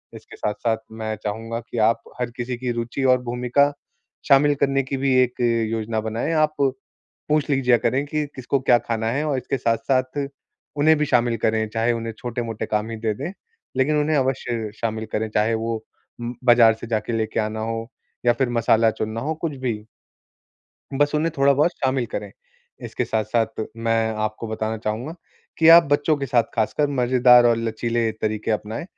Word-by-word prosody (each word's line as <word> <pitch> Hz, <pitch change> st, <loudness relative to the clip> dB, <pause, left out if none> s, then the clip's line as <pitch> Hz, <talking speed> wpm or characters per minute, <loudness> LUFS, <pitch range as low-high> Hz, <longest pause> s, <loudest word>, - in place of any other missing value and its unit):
इसके -, -, -12 dB
साथ-साथ 110 Hz, +2 st, -1 dB
मैं 110 Hz, -1 st, -4 dB
चाहूँगा 115 Hz, +2 st, -4 dB
कि 120 Hz, +1 st, -9 dB
आप 115 Hz, 0 st, -1 dB, 0.2 s
हर 125 Hz, -1 st, -2 dB
किसी 120 Hz, 0 st, -3 dB
की 125 Hz, 0 st, -2 dB
रुचि 120 Hz, +3 st, -3 dB
और 130 Hz, -1 st, +4 dB
भूमिका 125 Hz, +4 st, +1 dB, 0.6 s
शामिल 145 Hz, +1 st, +5 dB
करने 135 Hz, 0 st, +1 dB
की 135 Hz, +1 st, -4 dB
भी 135 Hz, 0 st, +1 dB
एक 125 Hz, 0 st, -4 dB, 0.3 s
योजना 110 Hz, 0 st, -2 dB
बनाएँ। 110 Hz, +7 st, -2 dB
आप 155 Hz, -1 st, +2 dB
पूछ 140 Hz, +2 st, -3 dB
लीजिआ 125 Hz, -3 st, +3 dB
करें 130 Hz, +5 st, 0 dB
कि 150 Hz, +1 st, -2 dB
किसको 130 Hz, +1 st, -1 dB
क्या 125 Hz, -2 st, +4 dB
खाना 115 Hz, -1 st, -2 dB
है 145 Hz, +5 st, -1 dB
और 145 Hz, -3 st, 0 dB
इसके 130 Hz, +2 st, -3 dB
साथ-साथ 130 Hz, +3 st, 0 dB, 0.5 s
उन्हें 155 Hz, +2 st, +5 dB
भी 150 Hz, -, +1 dB
शामिल 120 Hz, -3 st, +2 dB
करें, 110 Hz, 0 st, 0 dB
चाहे 115 Hz, +2 st, +1 dB
उन्हें 115 Hz, -1 st, -4 dB
छोटे-मोटे 115 Hz, -2 st, -4 dB
काम 105 Hz, +1 st, -1 dB
ही 115 Hz, -, -5 dB
दे 110 Hz, -1 st, -1 dB
दें, 140 Hz, -, -5 dB, 0.5 s
लेकिन 145 Hz, +3 st, +2 dB
उन्हें 150 Hz, +1 st, +1 dB
अवश्य 120 Hz, -5 st, -1 dB
शामिल 110 Hz, -1 st, -2 dB
करें, 110 Hz, +1 st, -1 dB
चाहे 105 Hz, +1 st, +1 dB
वो 115 Hz, +1 st, -2 dB, 0.5 s
उम, 120 Hz, +1 st, -4 dB
बाज़ार 120 Hz, -2 st, +7 dB
से -, -, -6 dB
जाके 115 Hz, +1 st, -2 dB
लेके 110 Hz, 0 st, -1 dB
आना 110 Hz, +1 st, -3 dB
हो 115 Hz, 0 st, -4 dB, 0.4 s
या 120 Hz, -, +5 dB
फिर 125 Hz, +1 st, 0 dB
मसाला 115 Hz, -1 st, +3 dB
चुनना 110 Hz, +1 st, -4 dB
हो, 155 Hz, +3 st, -2 dB
कुछ 155 Hz, -4 st, -2 dB
भी। 115 Hz, -5 st, -3 dB, 1.1 s
बस 145 Hz, +2 st, +1 dB
उन्हें 155 Hz, +2 st, +1 dB
थोड़ा 140 Hz, 0 st, +4 dB
बहुत 150 Hz, +5 st, +3 dB
शामिल 130 Hz, -2 st, +1 dB
करें। -, -, -5 dB, 0.5 s
इसके -, -, -2 dB
साथ-साथ 110 Hz, 0 st, -1 dB
मैं 115 Hz, -1 st, 0 dB
आपको 110 Hz, +2 st, -4 dB
बताना 110 Hz, 0 st, -2 dB
चाहूँगा 115 Hz, +9 st, -4 dB, 0.4 s
कि 160 Hz, -, +5 dB
आप 170 Hz, +1 st, +10 dB
बच्चों 145 Hz, +2 st, +2 dB
के 140 Hz, -1 st, -3 dB
साथ, 120 Hz, -2 st, +3 dB
खासकर, 115 Hz, +6 st, +1 dB
मज़ेदार 125 Hz, -2 st, +5 dB
और 120 Hz, -1 st, +4 dB
लचीले 115 Hz, 0 st, -1 dB
तरीके 110 Hz, 0 st, -3 dB
अपनाएँ, 110 Hz, +4 st, -3 dB
120 Hz, 180 wpm, -22 LUFS, 110-135 Hz, 1.1 s, आप